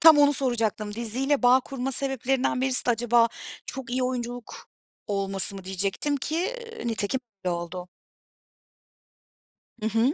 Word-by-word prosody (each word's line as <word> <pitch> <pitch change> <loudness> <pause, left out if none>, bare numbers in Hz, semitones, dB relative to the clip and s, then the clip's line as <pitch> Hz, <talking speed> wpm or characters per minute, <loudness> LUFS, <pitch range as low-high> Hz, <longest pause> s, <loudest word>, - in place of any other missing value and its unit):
Tam 320 -2 +9
onu 290 0 +6
soracaktım. 225 -6 -1
Diziyle 255 +5 0
bağ 250 +2 +6
kurma 270 0 -4
sebeplerinden 265 -1 0
birisi 260 -1 +3
de - - +4
acaba 235 0 +4 0.4
çok 265 -3 -6
iyi 255 +1 0
oyunculuk 245 -2 -4 0.4
olması 195 -1 +2
mı 195 -1 -8
diyecektim 195 +10 -1
ki, 335 - -1 0.3
iii, - - -4
nitekim 225 +4 -1 0.2
öyle 180 - +1
oldu. 175 +1 -6 1.9
Hı - - -2
hı. 230 +6 +2
245 Hz, 135 wpm, -26 LUFS, 210-270 Hz, 1.9 s, Tam